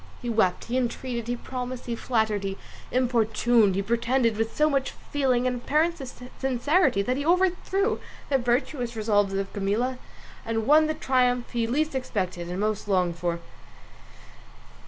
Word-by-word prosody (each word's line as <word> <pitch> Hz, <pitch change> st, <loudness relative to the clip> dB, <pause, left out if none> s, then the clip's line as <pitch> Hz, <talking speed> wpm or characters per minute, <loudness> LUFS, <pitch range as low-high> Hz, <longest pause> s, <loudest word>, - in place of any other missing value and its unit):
He 240 Hz, -2 st, -3 dB
wept, 215 Hz, -5 st, +2 dB
he 245 Hz, +2 st, -1 dB
entreated, 240 Hz, -1 st, -3 dB
he 245 Hz, -, -1 dB
promised, 250 Hz, 0 st, -6 dB
he 235 Hz, -, -2 dB
flattered, 220 Hz, -4 st, 0 dB
he 195 Hz, 0 st, -3 dB, 0.3 s
importuned, 235 Hz, -4 st, +3 dB
he 195 Hz, -, 0 dB
pretended 235 Hz, +2 st, +1 dB
with 225 Hz, +1 st, -2 dB
so 300 Hz, -, +4 dB
much 275 Hz, -3 st, 0 dB, 0.2 s
feeling 260 Hz, -4 st, +2 dB
and 250 Hz, -1 st, 0 dB
apparent 310 Hz, +6 st, +1 dB, 0.4 s
sincerity, 265 Hz, -, +2 dB
that 255 Hz, +5 st, 0 dB
he 285 Hz, -, -2 dB
overthrew 375 Hz, +5 st, +1 dB, 0.3 s
the 270 Hz, -2 st, +2 dB
virtuous 245 Hz, 0 st, -1 dB
resolves 205 Hz, -2 st, +1 dB
of 195 Hz, 0 st, -3 dB
Camilla 220 Hz, +6 st, -1 dB, 0.4 s
and 225 Hz, -1 st, -2 dB
won 305 Hz, +4 st, +6 dB
the 310 Hz, -, -1 dB
triumph 250 Hz, -4 st, +1 dB
he 235 Hz, -2 st, 0 dB
least 300 Hz, +6 st, 0 dB
expected 185 Hz, -9 st, -3 dB
and 180 Hz, +2 st, -3 dB
most 210 Hz, 0 st, -1 dB
longed 180 Hz, -4 st, +1 dB
for. 170 Hz, 0 st, -2 dB
240 Hz, 155 wpm, -26 LUFS, 215-265 Hz, 0.4 s, won